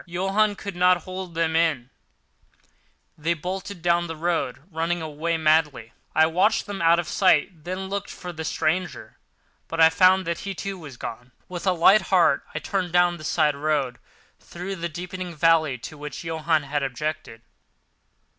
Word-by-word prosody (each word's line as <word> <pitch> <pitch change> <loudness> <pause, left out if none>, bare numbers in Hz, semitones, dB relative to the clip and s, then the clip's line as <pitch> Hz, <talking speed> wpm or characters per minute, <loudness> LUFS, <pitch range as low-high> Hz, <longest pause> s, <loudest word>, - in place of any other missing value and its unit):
Johann 195 +4 +1
could 200 -2 -7
not 180 -1 +3
hold 185 -2 -7
them 165 -1 0
in; 150 -7 +1 1.2
they 165 +3 -1
bolted 185 +2 -6
down 175 0 +2
the 165 - -5
road, 160 -5 -2
running 165 +2 -1
away 160 +1 -2
madly. 155 -7 +1 0.2
I 160 - +6
watched 180 +7 +2
them 200 -3 -5
out 165 0 +5
of 175 -2 -2
sight, 170 -3 +2
then 185 +2 -4
looked 200 +1 -4
for 180 -1 -8
the 160 -1 -6
stranger, 165 +3 -2 0.5
but 165 - -5
I 160 0 +7
found 185 +2 +4
that 170 0 -2
he, 195 -1 -5
too, 195 +1 -5
was 145 -7 -10
gone. 120 +2 -8
With 180 +1 -6
a - - +5
light 190 +5 +6
heart 185 -2 +3
I - - -1
turned 185 -3 -2
down 175 0 +3
the 155 - -11
side 150 -1 +1
road 140 -4 -1 0.4
through 185 +3 -7
the 170 0 -3
deepening 180 +1 -6
valley 160 -4 +3
to 145 +5 -10
which 150 0 -7
Johann 160 -1 0
had 145 +1 -2
objected. 140 -3 -4
165 Hz, 170 wpm, -24 LUFS, 155-180 Hz, 1.2 s, I